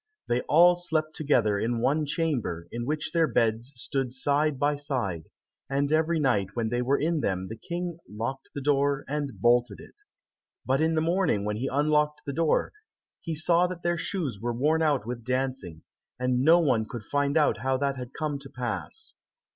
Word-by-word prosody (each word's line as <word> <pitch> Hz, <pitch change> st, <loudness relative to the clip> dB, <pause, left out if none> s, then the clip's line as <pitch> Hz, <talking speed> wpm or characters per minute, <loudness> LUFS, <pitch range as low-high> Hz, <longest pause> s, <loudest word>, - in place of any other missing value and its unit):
They 120 Hz, +1 st, +1 dB
all 175 Hz, +3 st, +7 dB
slept 160 Hz, -3 st, -1 dB
together 120 Hz, -10 st, +2 dB
in 115 Hz, +2 st, -1 dB
one 150 Hz, +5 st, +1 dB
chamber, 140 Hz, -, -2 dB
in 120 Hz, +1 st, -4 dB
which 150 Hz, +1 st, -2 dB
their 165 Hz, -1 st, +3 dB
beds 115 Hz, 0 st, 0 dB
stood 125 Hz, 0 st, -2 dB
side 145 Hz, +2 st, +1 dB
by 145 Hz, +2 st, +1 dB
side, 120 Hz, -, -3 dB, 0.4 s
and 140 Hz, +1 st, 0 dB
every 160 Hz, +1 st, +2 dB
night 105 Hz, -9 st, +1 dB
when 115 Hz, -2 st, -1 dB
they 120 Hz, +1 st, 0 dB
were 135 Hz, +3 st, +2 dB
in 160 Hz, +2 st, 0 dB
them 95 Hz, -4 st, -2 dB
the 110 Hz, -, -5 dB
King 170 Hz, +7 st, -5 dB
locked 115 Hz, +6 st, -5 dB
the 140 Hz, -, -3 dB
door, 140 Hz, 0 st, +1 dB
and 145 Hz, -2 st, -3 dB
bolted 120 Hz, -1 st, +2 dB
it. -, -, -13 dB, 0.7 s
But 135 Hz, +3 st, +1 dB
in 160 Hz, +1 st, +2 dB
the 155 Hz, -, +2 dB
morning 165 Hz, -, +1 dB
when 105 Hz, 0 st, -2 dB
he 130 Hz, +4 st, -2 dB
unlocked 150 Hz, +1 st, +1 dB
the 140 Hz, -, -3 dB
door, 160 Hz, +1 st, +1 dB, 0.5 s
he 165 Hz, -, -4 dB
saw 170 Hz, +3 st, +3 dB
that 180 Hz, -1 st, -7 dB
their 175 Hz, 0 st, 0 dB
shoes 160 Hz, -, -3 dB
were 120 Hz, +1 st, -1 dB
worn 150 Hz, +7 st, +1 dB
out 145 Hz, -8 st, +1 dB
with 120 Hz, 0 st, -5 dB
dancing, 125 Hz, -10 st, -3 dB, 0.4 s
and 125 Hz, 0 st, +1 dB
no 160 Hz, +5 st, +6 dB
one 130 Hz, -10 st, +2 dB
could 120 Hz, -3 st, -6 dB
find 145 Hz, +5 st, 0 dB
out 150 Hz, -7 st, +3 dB
how 130 Hz, +2 st, 0 dB
that 140 Hz, 0 st, -1 dB
had 125 Hz, -1 st, -7 dB
come 150 Hz, -2 st, -3 dB
to 135 Hz, -1 st, -10 dB
pass. 125 Hz, -, -5 dB
140 Hz, 190 wpm, -27 LUFS, 120-155 Hz, 0.7 s, all